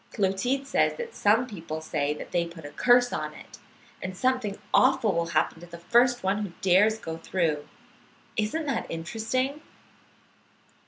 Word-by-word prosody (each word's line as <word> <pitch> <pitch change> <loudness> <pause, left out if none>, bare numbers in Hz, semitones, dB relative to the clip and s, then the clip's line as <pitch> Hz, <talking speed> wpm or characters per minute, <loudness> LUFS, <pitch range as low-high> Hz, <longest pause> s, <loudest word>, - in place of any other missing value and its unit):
Clotilde 225 +7 0
says 275 - +2
that 475 -1 -6
some 220 +4 +3
people 165 -9 -6
say 145 -2 -1
that - - -9
they 170 -1 +1
put 165 -2 -11
a 145 - -7
curse 245 +4 +4
on - - -3
it, - - -13 0.4
and 185 0 -5
something 255 -5 0 0.2
awful 255 -6 +4
will 170 0 0
happen 170 -1 0
to 175 - -11
the 170 0 -10
first 240 +7 +3
one 195 +2 +1
who 190 -4 -6
dares 200 +4 +4
to - - -21
go 160 0 -4
through. 165 -3 -1 0.7
Isn't 220 +10 -1
that 275 - -2
interesting? 230 - -2
205 Hz, 165 wpm, -27 LUFS, 170-245 Hz, 0.7 s, curse